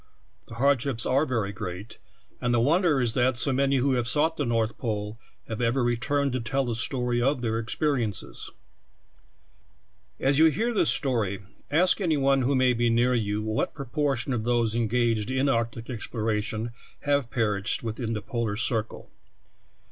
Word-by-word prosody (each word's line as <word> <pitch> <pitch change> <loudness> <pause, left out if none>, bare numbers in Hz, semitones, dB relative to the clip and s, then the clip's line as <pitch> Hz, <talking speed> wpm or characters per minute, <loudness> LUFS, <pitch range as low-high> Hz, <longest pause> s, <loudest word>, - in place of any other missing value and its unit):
The 115 - -10
hardships 130 -2 +1
are 140 +4 +2
ver}^ 110 -5 -1
great, 95 +2 -7 0.4
and 120 0 +1
the - - +3
wonder 155 +3 +3
is 120 -3 +1
that 125 -1 +2
so 135 +2 +3
many 140 +1 +2
who 135 +1 +2
ha^^e 120 -2 0
sought 155 +6 +2
the 145 -5 -2
North 115 -1 -1
Pole 105 -2 -3 0.3
have 110 +1 -4
ever 120 +2 +1
returned 130 +3 0
to 130 - -1
tell 135 +4 -1
the 120 - -2
story 120 +1 0
of 135 +1 +1
their 115 -1 0
experiences. 115 - -2 1.7
As 135 +2 +2
you 160 - +7
read 225 - -1
this - - +3
story, 110 -8 0 0.3
ask 175 +7 +3
any 165 -5 +1
one 135 -1 +3
who 135 +3 +1
may 130 -1 +3
be 120 0 +1
near 120 +2 +2
you 105 -3 -1
what 110 0 -2
proportion 140 -2 -1
of 115 -3 -2
those 120 -2 +1
engaged 115 -1 0
in 130 +2 +1
arc 115 -3 +1
tic 115 0 -9
exploration 110 -1 -3 0.3
have 140 -4 0
perished 105 -2 0
within 115 0 -3
the 105 - -4
polar 115 -5 -2
cir 115 0 +1
cle. 110 - -13
120 Hz, 170 wpm, -26 LUFS, 115-135 Hz, 1.7 s, you